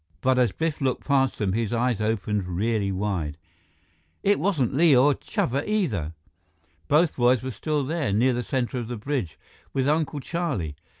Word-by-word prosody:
But 130 0 +3
as 125 -2 +3
Biff 160 -2 -2
looked 130 -2 -1
past 135 -2 +2
them, 100 -3 0
his 115 -1 -1
eyes 120 -2 0
opened 105 -2 -1
really 100 +2 0
wide. 95 -7 -2 0.9
It 205 +1 +3
wasn't 155 - +1
Li 155 0 +5
or 140 +4 +5
Chuba 135 +1 -2
either! 110 - 0 0.7
Both 155 +2 +3
boys 125 0 +3
were 130 - -3
still 150 +6 -1
there, 145 -5 -1
near 120 +6 +3
the 120 - -1
center 125 0 -2
of 120 - -5
the 120 0 -4
bridge, 110 - -3 0.4
with 135 0 +1
Uncle 150 -1 0
Charlie! 135 - -3
125 Hz, 170 wpm, -25 LUFS, 105-145 Hz, 0.9 s, Li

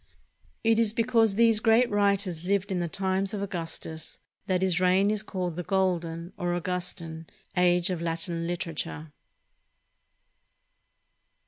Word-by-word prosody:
It 225 0 +4
is 220 -2 +3
because 225 -3 +3
these 225 -1 +5
great 225 +2 +4
writers 200 -4 +1
lived 195 +1 0
in 185 - 0
the 175 - -1
times 190 +3 -1
of 200 - -3
Augustus 165 -3 -5 0.3
that 185 -1 +1
his 180 -2 +1
reign 185 +3 +3
is 215 -1 0
called 180 -5 -4
the - - -1
Golden, 175 -2 -1
or 175 0 -1
Augus 180 +1 -2
tan, 160 -1 -8 0.3
Age 180 0 +3
of 175 -2 -3
Latin 165 0 -2
literature. 165 -3 -4
185 Hz, 135 wpm, -27 LUFS, 170-200 Hz, 0.3 s, these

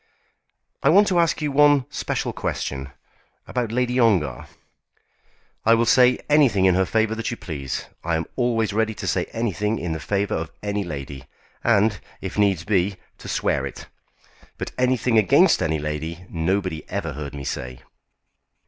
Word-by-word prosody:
"I - - +3
want 200 +5 +6
to 180 -2 +2
ask 165 -2 +1
you 150 - 0
one 145 -1 +5
special - - -2
question, 70 -1 -4 0.6
about 120 -3 -2
Lady 125 +1 0
Ongar." 90 - +2 1.2
"I 115 +1 +5
will 115 +1 +2
say 125 +2 +5
anything 135 -11 +4
in 95 - +5
her 95 0 +2
favour 110 0 +1
that 115 0 -3
you 120 - -4
please. 70 -8 -5 0.2
I 85 0 0
am 80 0 -1
always 115 -4 0
ready 110 0 0
to - - -6
say - - 0
anything 105 -1 -2
in 85 - -4
the 80 - -3
favour 100 +7 -1
of 80 0 -2
any 105 0 -1
lady, 70 -5 -7 0.4
and, 110 -3 +3 0.2
if - - -6
needs 100 -5 +2
be, 100 +1 +1 0.2
to - - -10
swear - - 0
it. - - -7 0.7
But - - -5
anything 125 -2 +2
against 105 - +4
any 80 0 +1
lady 80 +4 -5
nobody 90 -1 -1
ever 85 -5 -3
heard 70 0 -6
me 70 - -6
say." 65 -1 -5
100 Hz, 165 wpm, -23 LUFS, 80-120 Hz, 1.2 s, want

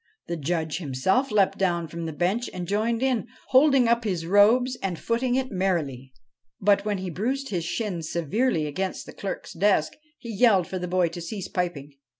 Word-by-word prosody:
The 170 - -3
Judge 160 0 -2
himself 180 - 0
leapt 200 -3 +2
down 170 -3 +1
from 165 +1 -5
the - - -3
bench 185 +10 -1
and 180 -1 -4
joined 225 +5 0
in, 255 -6 0 0.2
holding 270 -2 +5
up 235 0 +2
his 180 -6 -2
robes 225 +7 +4
and 185 -3 -2
footing 245 +5 0
it 260 0 -1
merrily. 160 -10 -1 0.5
But, 200 0 +3
when 210 -2 0
he 185 -1 -4
bruised 260 - -2
his 175 -4 -2
shins 175 -5 -3
severely 170 - 0
against 185 +6 -3
the - - -11
clerk's 195 - -6
desk, 190 -3 +2 0.2
he 235 -2 -7
yelled 200 -4 +4
for 185 - -5
the 180 - -4
boy 180 -1 +2
to 170 +1 -7
cease 190 +2 -5
piping. 170 -6 -3
190 Hz, 185 wpm, -25 LUFS, 170-230 Hz, 0.5 s, holding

